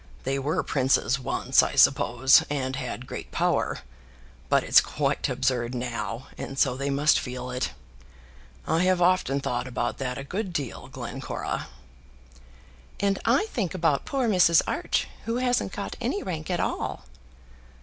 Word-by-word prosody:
They 135 +1 -1
were 155 +5 0
princes 130 -2 +1
once, 130 - +2
I - - -2
suppose, 130 +3 +5
and 135 -2 -2
had 125 -1 -5
great - - -7
power. - - 0 0.7
But - - +3
it's - - +6
quite - - -1
absurd 125 -2 0
now, 115 -1 -4
and 135 - -6
so 125 - +2
they 140 +2 -2
must 145 +2 +3
feel 125 0 -5
it. 125 0 -2 0.9
I 160 - +1
have 185 -1 +3
often 175 -6 +2
thought 125 -1 -2
about 120 -1 -3
that 125 -2 -3
a 140 - -5
good 185 +5 -4
deal, 140 -7 -4
Glencora." - - -5 1.3
"And 200 -1 +1
I 250 - +3
think 195 -6 -2
about 165 -5 +1
poor 265 -3 0
Mrs. 180 -5 +5
Arch, - - -1 0.2
who 230 - -1
hasn't 250 -1 +1
got - - -5
any 405 - -1
rank 160 -3 -5
at 175 -2 0
all." - - -3
140 Hz, 150 wpm, -26 LUFS, 125-180 Hz, 1.3 s, it's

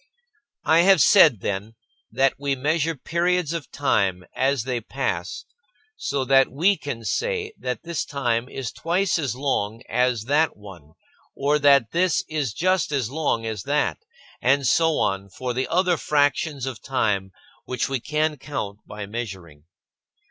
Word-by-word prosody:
I 160 - +5
have 190 +1 +6
said, 155 - +6
then, 100 +3 -4 0.4
that 135 0 +2
we 140 -1 0
measure 155 +4 0
periods 170 +2 0
of 165 -4 -5
time 100 -10 0
as 135 -2 +1
they 125 -2 -2
pass 110 -8 -3 0.5
so 140 - -2
that 135 0 +4
we 175 +9 +3
can 130 -9 -6
say 445 - -1
that 125 - -4
this 170 -1 -2
time 125 -3 -1
is 130 -6 -5
twice 175 +2 0
as 135 -7 -2
long 120 -4 -2
as 125 -3 +1
that 145 +4 +1
one 90 -7 -13 0.4
or 145 +2 +1
that 140 -5 +4
this 175 0 +1
is 150 -6 -2
just 185 - +1
as 130 -5 -1
long 140 -7 -1
as 110 -3 -3
that, 145 +2 0 0.4
and 140 +2 +3
so 160 +4 +3
on 100 0 -1
for 125 +6 -4
the 130 +2 -1
other 180 0 +2
fractions 145 -1 +1
of 130 -3 -6
time 105 -7 -1 0.3
which 125 -2 -2
we 135 -1 -2
can 150 +4 -1
count 105 -8 -5
by 105 0 -7
measuring. 95 -9 -7
135 Hz, 155 wpm, -23 LUFS, 115-155 Hz, 0.5 s, have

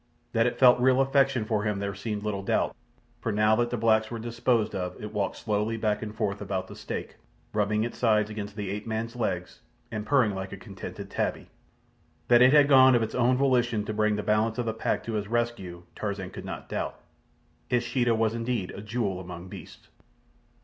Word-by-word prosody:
That 115 +1 +3
it 120 - -2
felt 125 -2 +6
real 130 +1 +4
affection 135 -3 +3
for 110 -1 0
him 105 -1 -1
there 100 0 -3
seemed 105 +1 -4
little 105 -2 -2
doubt, 100 - 0 0.4
for 115 - -2
now 105 +1 +3
that 120 0 +1
the 120 - -2
blacks 110 -1 +3
were 115 - -4
disposed 115 0 0
of 90 -1 -4
it 105 0 -7
walked 100 -2 -1
slowly 105 +1 -1
back 105 -2 0
and 110 -1 -6
forth 100 -2 -2
about 95 -2 -2
the - - -10
stake, - - -6 0.4
rubbing 105 0 +1
its 120 - -5
sides 105 -3 +3
against 105 -1 -6
the 100 -3 -4
ape 105 +2 -5
man's 115 +2 -3
legs 90 -7 -3 0.3
and 105 -1 -3
purring 125 -4 +3
like 95 0 -5
a 100 - -6
contented 95 -1 -9
tabby. - - -2 0.8
That 120 0 +7
it 125 +1 +7
had 145 -1 +6
gone 130 -2 +7
of 120 - +3
its 110 - -4
own 125 +1 +3
volition 120 -5 +2
to 110 - -3
bring 105 0 +2
the 105 - -3
balance 110 +1 +1
of 120 - -1
the 110 - -1
pack 110 - -1
to 115 - -4
his 105 -1 -2
rescue, 115 -7 -2
Tarzan 100 -3 -4
could - - -8
not - - -6
doubt. - - -4 0.7
His 120 -1 +2
Sheeta 120 -1 +1
was 110 0 +1
indeed 115 -4 -2
a 100 - -8
jewel 105 -3 -2
among 90 0 -8
beasts. - - -11
110 Hz, 210 wpm, -27 LUFS, 105-120 Hz, 0.8 s, That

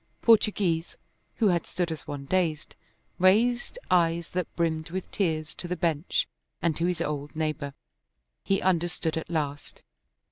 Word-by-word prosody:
Portoghese, 200 -7 +3 0.4
who 220 -4 +3
had 175 -2 +1
stood 175 -2 -1
as 160 - -6
one 140 -1 -5
dazed, 165 -2 0 0.4
raised 235 - +3
eyes 170 -1 +3
that 180 -2 -1
brimmed 160 -2 0
with 185 +2 -5
tears 155 -6 -1
to 175 - -7
the 180 - -1
bench 165 -3 0 0.3
and 165 -3 +1
to 170 +3 0
his 180 -2 -1
old 145 -2 -3
neighbor. 155 -3 -2 0.7
He 195 0 +1
understood 175 -3 +1
at 160 - -4
last. 145 -3 -3
170 Hz, 145 wpm, -28 LUFS, 155-185 Hz, 0.7 s, Portoghese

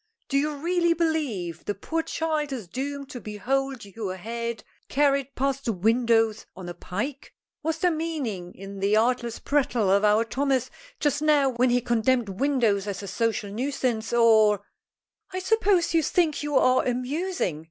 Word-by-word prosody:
Do 275 - +1
you 300 +1 -1
really 340 +3 +1
believe 270 - -1
the 205 - -2
poor 325 +11 -2
child 310 -3 -2
is 235 -8 -5
doomed 280 +5 -5
to 245 - -7
behold 265 +4 -2
your 200 -1 -5
head 235 +4 -4 0.3
carried 275 -1 +1
past 275 +1 -1
the 230 - +1
windows 225 +2 +2
on 185 -1 -8
a 175 - -5
pike? 235 +11 -5 0.3
Was 320 +1 -1
there 355 +2 +2
meaning 280 - -3
in 195 +1 -9
the 200 +2 +2
artless 235 0 +1
prattle 250 -8 +1
of 200 +1 +4
our 210 +2 +4
Thomas 265 +1 0 0.3
just 290 -1 +1
now 295 -3 +4
when 250 +1 +2
he 245 0 +2
condemned 240 -1 +1
windows 215 -3 +1
as 200 0 -4
a - - -6
social 215 0 -1
nuisance, 245 -1 -2
or 220 -4 +5 0.3
" 390 - -40
"I - - -2
suppose 380 -3 +2
you 330 - +4
think 320 0 +1
you 295 -1 -2
are 255 0 +4
amusing!" 255 - -2
250 Hz, 165 wpm, -26 LUFS, 215-290 Hz, 0.3 s, or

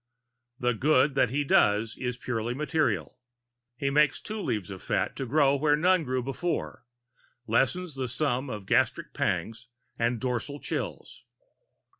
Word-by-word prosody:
The 125 0 +1
good 135 +3 +3
that 130 -3 +3
he 145 +4 0
does 110 -4 +3
is 125 -1 -3
purely 120 -1 -3
material. 135 - -1 0.6
He 140 +2 -1
makes 150 0 +3
two 215 0 -5
leaves 105 - -2
of 95 -2 -8
fat - - -1
to 135 - -3
grow 140 +1 +4
where 145 +1 +3
but 165 +4 +1
one 185 -3 +4
grew 130 -1 -1
before, 135 0 -3 0.6
lessens 155 +9 +1
the 135 -1 -3
sum 130 +1 -1
of 105 -4 -6
gastric - - +1
pangs 110 +8 -2 0.3
and 120 0 +1
dorsal 130 +3 -3
chills. - - -5
130 Hz, 150 wpm, -28 LUFS, 115-145 Hz, 0.6 s, grow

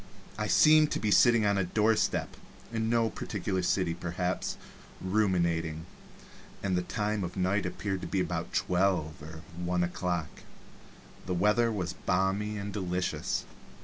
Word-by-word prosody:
I 105 +1 -2
seemed 155 +5 +6
to - - -1
be 105 - 0
sitting 115 +3 +5
on 100 -1 +2
a - - +2
doorstep 110 +4 +1 0.4
(in 110 0 0
no 115 -1 +2
particular 95 -2 -3
city 90 -1 +1
perhaps) 90 +1 -3 0.4
ruminating, 85 -5 0 0.8
and 95 -2 +1
the 90 - +1
time 105 +2 -2
of 90 +1 -5
night 95 +1 +1
appeared 95 0 -3
to - - -5
be 95 - -1
about - - -2
twelve 90 -5 0
or 80 +1 -9
one 90 0 0
o'clock. 85 -3 -3 0.9
The 90 - -1
weather 105 +5 +3
was 90 -5 -2
balmy 100 +3 0
and 100 0 -5
delicious. 90 -2 -2
95 Hz, 145 wpm, -30 LUFS, 90-105 Hz, 0.9 s, seemed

